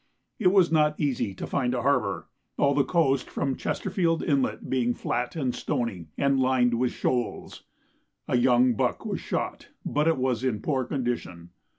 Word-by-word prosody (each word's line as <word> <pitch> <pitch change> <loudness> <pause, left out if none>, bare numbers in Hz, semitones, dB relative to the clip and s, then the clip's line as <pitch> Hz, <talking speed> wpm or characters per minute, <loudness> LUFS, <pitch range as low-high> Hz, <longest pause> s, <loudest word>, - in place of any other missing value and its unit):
It 205 - +3
was 185 -2 +4
not 150 -1 +2
easy 130 -9 -1
to - - -5
find 125 -2 -1
a 120 - -2
harbour, 100 - 0 0.3
all 140 0 +3
the 140 0 +3
coast 135 -4 +1
from 135 -2 -1
Chesterfield 165 -3 -1
Inlet 140 -4 0
being 120 -2 0
flat 120 +4 -2
and 130 -6 -1
stony, 115 -8 -3
and 140 -1 +2
lined 130 -2 +3
with 125 -1 +1
shoals. 125 -2 -3 0.6
A - - +1
young 125 0 +4
buck 105 - -1
was - - -3
shot, - - -3 0.2
but 150 +2 +1
it 165 - +3
was 130 -2 0
in 125 -5 0
poor 135 -4 0
condition. 120 -11 -4
130 Hz, 170 wpm, -26 LUFS, 120-140 Hz, 0.6 s, was